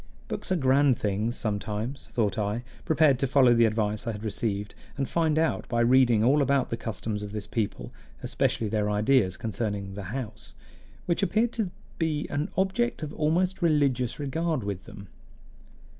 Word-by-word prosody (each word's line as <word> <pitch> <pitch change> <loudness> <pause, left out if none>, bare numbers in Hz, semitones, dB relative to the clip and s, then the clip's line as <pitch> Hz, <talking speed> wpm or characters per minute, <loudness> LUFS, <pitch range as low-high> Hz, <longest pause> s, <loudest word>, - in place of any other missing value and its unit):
Books - - -5
are - - +4
grand 135 -3 +3
things 105 +3 -1
sometimes, 110 +5 -3
thought 105 -5 0
I, 105 +2 -2 0.2
prepared 155 -5 +4
to 135 - +1
follow 130 -2 +5
the 115 0 +5
advice 110 0 -1
I 115 - -1
had 105 +1 -8
received, 105 -2 -2 0.2
and 135 -2 -1
find 160 -2 +1
out 160 0 0
by 120 -1 +1
reading 120 -2 +4
all 140 +5 +4
about 140 -1 +1
the - - +1
customs 110 -1 -4
of 105 0 -7
this 105 -2 -4
people, 110 -1 -3 0.3
especially 110 - 0
their 105 0 0
ideas 105 -2 +2
concerning 100 -3 -3
The 100 -1 -6
House, 120 -2 -7 0.5
which 170 - 0
appeared 220 +6 +2
to 220 -6 -2 0.3
be 155 -3 0
an 145 +2 -1
object 195 +2 0
of 150 0 -5
almost 175 +5 0
religious 140 -7 +2
regard 150 0 -1
with 100 -2 -4
them. 100 -1 -11
120 Hz, 170 wpm, -27 LUFS, 105-150 Hz, 0.5 s, follow